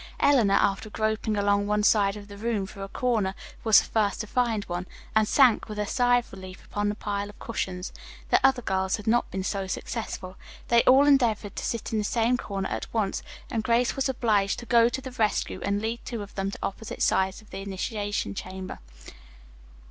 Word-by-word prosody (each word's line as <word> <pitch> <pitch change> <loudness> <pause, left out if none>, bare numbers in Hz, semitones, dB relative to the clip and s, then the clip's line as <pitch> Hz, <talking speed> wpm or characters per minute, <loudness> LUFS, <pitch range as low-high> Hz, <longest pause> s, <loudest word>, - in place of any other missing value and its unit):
Eleanor, 235 -9 +4
after 200 +2 +1
groping 215 0 -1
along 205 0 +2
one 210 0 +1
side 205 -1 +3
of 205 -1 -10
the 205 - -10
room 215 -1 -1
for 200 0 -10
a 195 - -4
corner, 210 -3 0 0.3
was 220 -3 +6
the - - +5
first 210 -3 0
to - - -2
find 225 -2 0
one, 175 0 -4 0.3
and 215 -1 +4
sank 255 -5 +4
with 210 - -6
a 210 - 0
sigh 245 +2 +3
of 240 - -4
relief 185 -1 -10
upon 205 0 -1
the 205 - -2
pile 205 -1 -3
of 205 - -14
cushions. 185 -5 -4 0.4
The - - +4
other 265 -2 +4
girls 190 -1 0
had 210 - -9
not 235 +2 +2
been 190 0 -3
so 195 0 -2
successful. 185 -2 -5 0.3
They 235 0 +6
all 265 +3 +7
endeavored 235 -8 +2
to - - -4
sit 230 -2 -3
in 220 - +2
the - - 0
same 230 +3 +2
corner 195 -5 -4
at - - -4
once, 210 -4 -1 0.3
and 225 -2 -1
Grace 235 +2 +2
was 270 0 0
obliged 215 -6 +1
to 240 - -8
go 235 -1 +5
to 260 +2 -4
the 260 -1 -7
rescue, 220 -4 0
and 200 0 0
lead 230 +1 -2
two 230 -4 -5
of 200 - -12
them 195 0 -2
to - - -6
opposite 210 +3 -4
sides 190 0 +2
of 215 - -19
the 190 - -6
initiation 200 - -3
chamber. 185 - -7
210 Hz, 210 wpm, -26 LUFS, 195-235 Hz, 0.4 s, all